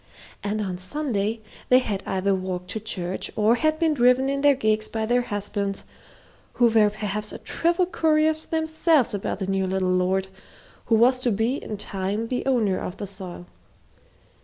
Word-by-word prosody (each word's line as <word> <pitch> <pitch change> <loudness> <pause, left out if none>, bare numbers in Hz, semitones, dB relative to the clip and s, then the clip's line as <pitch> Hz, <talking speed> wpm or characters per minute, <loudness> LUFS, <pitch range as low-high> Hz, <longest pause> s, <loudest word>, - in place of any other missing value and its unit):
And 210 +1 -1
on 185 -3 -3
Sunday 220 0 -2 0.3
they 255 - +7
had 210 -6 -1
either 195 +1 +1
walked 185 -1 -4
to 220 - -3
church 185 -4 -3
or 215 +2 +4
had 310 +6 +1
been 320 -1 +2
driven 250 0 +3
in 275 0 -1
their 285 -1 +5
gigs 215 -3 +1
by 220 -1 -2
their 245 +2 +2
husbands, 205 -3 -3 0.7
who 240 -1 +4
were 220 -2 +4
perhaps 210 0 -3
a - - -6
trifle 345 +2 0
curious 315 -2 +1
themselves 315 -4 +1
about 200 - -2
the 195 - -3
new 190 0 0
little 185 -1 0
lord 185 +1 +1 0.6
who 225 - +4
was 250 +3 +4
to 255 - 0
be 225 +5 0
in 210 - -6
time 200 +3 -3
the 250 - -1
owner 225 -8 +2
of 180 - -6
the 205 - -4
soil. 190 - -8
215 Hz, 175 wpm, -24 LUFS, 195-255 Hz, 0.7 s, they